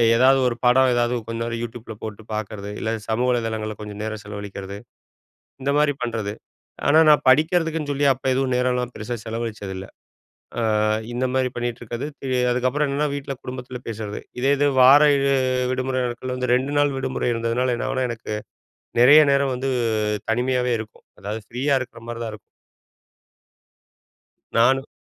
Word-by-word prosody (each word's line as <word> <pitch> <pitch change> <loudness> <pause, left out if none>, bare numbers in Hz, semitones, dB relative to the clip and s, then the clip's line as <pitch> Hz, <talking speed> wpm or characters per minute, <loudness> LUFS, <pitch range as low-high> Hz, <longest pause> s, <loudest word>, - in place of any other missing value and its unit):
ஏதாவது 130 +3 +5
ஒரு 120 - -1
படம் 130 +1 +5
ஏதாவது 120 0 +1
கொஞ்ச 115 0 -4
நேரம் 115 0 -3
Yotubeல 115 -1 -7
போட்டு 110 0 -7
பாக்கிறது, 105 -1 -5
இல்ல 110 - -2 0.2
சமூக 120 +3 +1
வலைதளங்களில் 110 -3 -2
கொஞ்சம் 105 0 -7
நேரம் 110 -1 -4
செலவழிக்கிறது, 100 -1 -7 0.8
இந்த 140 +2 0
மாதிரி 150 -1 +3
பண்ணுறது. 110 -4 -2 0.5
ஆனா, 150 +2 +5
நான் 150 -1 +5
படிக்கிறதுக்குன்னு 160 +1 +2
சொல்லி 140 0 +1
அப்போ 130 - -9
எதுவும் 130 -1 0
நேரம்லாம் 125 -1 0
பெருசா 120 +3 -4
செலவழிச்சது 110 -4 -4
இல்ல. 95 +1 -7 0.7
அ - - 0 0.5
இந்த 125 +2 0
மாதிரி 130 -1 +1
பண்ணிகிட்டு 120 0 -3
இருக்கிறது. 120 +4 -5 0.4
அதுக்கப்புறம் 130 +4 +1
என்னன்னா 145 +2 0
வீட்ல 140 -1 -4
குடும்பத்தில 125 0 -6
பேசுறது. 110 -2 -5 0.2
இதே 135 +3 +2
இது 145 +1 +3
வார 135 +3 +8 0.7
விடுமுறை 130 0 -1
நாட்களில் 125 +1 -4
வந்து 125 -1 -1
2 130 +3 -1
நாள் 145 -2 +2
விடுமுறை 130 -1 -1
இருந்ததுனால 115 +2 0
என்ன - - -3
ஆகும்னா, 130 -1 0
எனக்கு 115 -2 -6 0.7
நெறைய 145 +5 +9
நேரம் 140 -1 +2
வந்து 130 +2 -2 0.6
தனிமையாவே 125 +1 +1
இருக்கும். 110 -1 -11
அதாவது 105 +2 -5
ஃப்ரீயா 135 +4 +1
இருக்குற 125 -2 -8
மாதிரி 120 0 -5
தான் 110 - -5
இருக்கும். - - -10 2.2
நானும் 130 +4 +3
125 Hz, 150 wpm, -23 LUFS, 115-130 Hz, 2.2 s, நெறைய